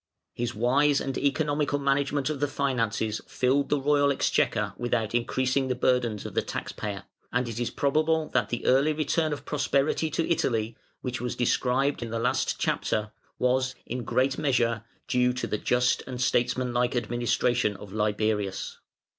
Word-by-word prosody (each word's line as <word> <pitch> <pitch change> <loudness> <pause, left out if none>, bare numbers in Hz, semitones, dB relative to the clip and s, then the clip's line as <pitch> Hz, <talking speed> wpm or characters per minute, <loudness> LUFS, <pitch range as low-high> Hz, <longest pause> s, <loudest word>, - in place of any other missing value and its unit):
His 120 -1 -3
wise 140 +6 +3
and 135 -1 -3
economical 145 0 +1
management 140 0 +1
of 145 - -4
the 145 - +1
finances 115 -6 -1
filled 135 +2 +1
the 145 - +2
royal 145 0 +3
exchequer 135 - +1
without 115 -3 -1
increasing 130 +3 +1
the 125 - 0
burdens 120 -4 +1
of - - -6
the - - +2
tax - - -5
payer, 100 -2 -5 0.3
and 125 0 0
it 115 0 -5
is 120 - -1
probable 155 +2 +1
that - - +1
the 120 - -3
early 140 +4 +4
return 155 +1 0
of 145 - -5
prosperity 145 +1 +1
to 165 - -1
Italy, 115 -8 0 0.3
which 125 -1 -4
was 125 -1 -3
described 130 +3 +1
in 120 - -4
the 115 - -2
last 125 +3 0
chapter, 105 0 -1 0.3
was, 130 +1 +1
in 125 +1 -4
great 130 +4 +1
measure, 115 -5 +1 0.2
due 125 0 +2
to 125 - -3
the 105 - -2
just 125 0 +2
and 125 -2 -5
statesmanlike 125 0 +1
administration 120 -1 +1
of 100 0 -11
Liberius. 105 -2 -1
125 Hz, 165 wpm, -27 LUFS, 120-140 Hz, 0.3 s, early